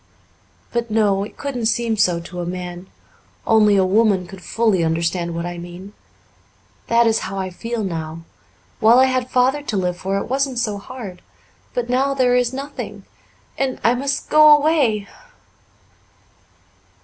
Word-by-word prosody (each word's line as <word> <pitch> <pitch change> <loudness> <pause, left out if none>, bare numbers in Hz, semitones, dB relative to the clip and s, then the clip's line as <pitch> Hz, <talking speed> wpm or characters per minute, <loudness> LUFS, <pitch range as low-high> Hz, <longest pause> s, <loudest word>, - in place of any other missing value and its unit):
"But, 235 -1 -2
no, 205 -3 +2
it 205 - -10
couldn't 250 -5 -2
seem 230 0 0
so 185 -5 +2
to 175 +1 -9
a - - -4
man. 180 0 -6 0.6
Only 215 -2 +4
a 190 -1 +3
woman 200 -1 +2
could 185 +1 -12
fully 215 -5 +1
understand 170 +1 -1
what 170 0 -3
I 175 0 -5
mean. 175 +3 -10 0.9
That 235 0 +4
is 225 -1 +2
how 195 - -6
I 190 -1 -3
feel 230 +4 -4
now. 165 -3 -5 0.6
While 225 +3 +6
I 260 - +6
had 255 -1 -1
Father 260 +3 +2
to 230 -8 -3
live 180 -1 -1
for 195 +2 -2
it 200 - -2
wasn't 270 0 -1
so 215 -4 -1
hard. 200 -5 -9 0.5
But 245 -1 -1
now 270 +3 +1
there 250 -2 +3
is 245 -1 +2
nothing. 260 -7 -7 0.5
And 265 -1 -1
I 230 - +4
must 275 +2 -2
go 305 -1 +8
away." 280 -10 +1
220 Hz, 160 wpm, -20 LUFS, 185-250 Hz, 0.9 s, go